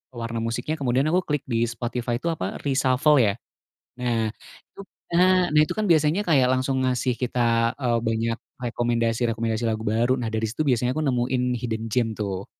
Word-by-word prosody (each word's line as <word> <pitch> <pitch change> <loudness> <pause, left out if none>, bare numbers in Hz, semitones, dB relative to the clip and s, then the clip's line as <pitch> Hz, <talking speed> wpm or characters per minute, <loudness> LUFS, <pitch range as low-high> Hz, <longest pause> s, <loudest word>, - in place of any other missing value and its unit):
warna 115 0 -4
musiknya, 115 +8 -3
kemudian 130 -1 +1
aku 180 - +3
klik 150 -2 -1
di 120 -1 0
Spotify 120 0 -3
itu 165 +8 -2
apa 160 - -4
reshuffle 135 +1 +3
ya? 105 -4 +4 0.7
Nah 115 -3 0 0.4
itu - - -19 0.3
nah! 180 +1 +4
Nah 150 0 +4
itu - - -4
kan 215 -1 -1
biasanya 155 +4 +3
kayak 145 -9 +3
langsung 130 +1 0
ngasih 125 0 0
kita, 125 0 -2 0.4
eee, 120 -2 +1
banyak 115 +1 0 0.3
rekomendasi-rekomendasi 115 -1 -1
lagu 110 -1 -1
baru, 120 +3 +2
nah 115 - -2
dari 110 0 0
situ 115 +8 -3
biasanya 125 0 +1
aku 155 - -2
nemuin 125 0 0 0.2
hidden 110 -2 -3
gem 120 0 +2
tuh. 100 -2 -3
125 Hz, 170 wpm, -24 LUFS, 115-140 Hz, 0.7 s, ya